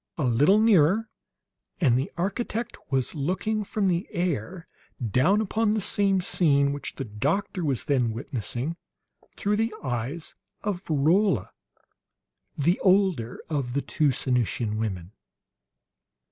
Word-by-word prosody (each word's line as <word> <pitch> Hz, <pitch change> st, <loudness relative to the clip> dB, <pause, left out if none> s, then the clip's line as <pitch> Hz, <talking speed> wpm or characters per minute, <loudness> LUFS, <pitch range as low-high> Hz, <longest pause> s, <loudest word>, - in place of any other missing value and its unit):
A 155 Hz, -, -1 dB
little 140 Hz, -, +4 dB
nearer, 215 Hz, 0 st, +4 dB, 0.7 s
and 135 Hz, -9 st, +4 dB
the 130 Hz, +3 st, -1 dB
architect 215 Hz, +5 st, -2 dB
was 130 Hz, -2 st, 0 dB
looking, 185 Hz, +8 st, -1 dB
from 200 Hz, 0 st, -1 dB
the 180 Hz, +2 st, 0 dB
air, 175 Hz, -, -2 dB, 0.3 s
down 130 Hz, -, +2 dB
upon 220 Hz, +1 st, +1 dB
the 220 Hz, -, +1 dB
same 195 Hz, -1 st, +1 dB
scene 140 Hz, -6 st, +3 dB
which 145 Hz, -, -6 dB
the 135 Hz, -, -4 dB
doctor 145 Hz, -, -1 dB
was 140 Hz, -5 st, -1 dB
then 130 Hz, -6 st, +1 dB
witnessing 125 Hz, -, -4 dB, 0.6 s
through 205 Hz, +1 st, 0 dB
the 225 Hz, 0 st, 0 dB
eyes 130 Hz, +5 st, -3 dB, 0.3 s
of 200 Hz, -4 st, -2 dB
Rolla, 160 Hz, -, +2 dB, 1.1 s
the 170 Hz, +6 st, +2 dB
older 185 Hz, -, +2 dB
of 140 Hz, -6 st, -2 dB
the 140 Hz, -, -1 dB
two 150 Hz, -3 st, +1 dB
Sanusian 120 Hz, -4 st, -1 dB
women. 95 Hz, -5 st, -3 dB
155 Hz, 125 wpm, -26 LUFS, 125-195 Hz, 1.1 s, little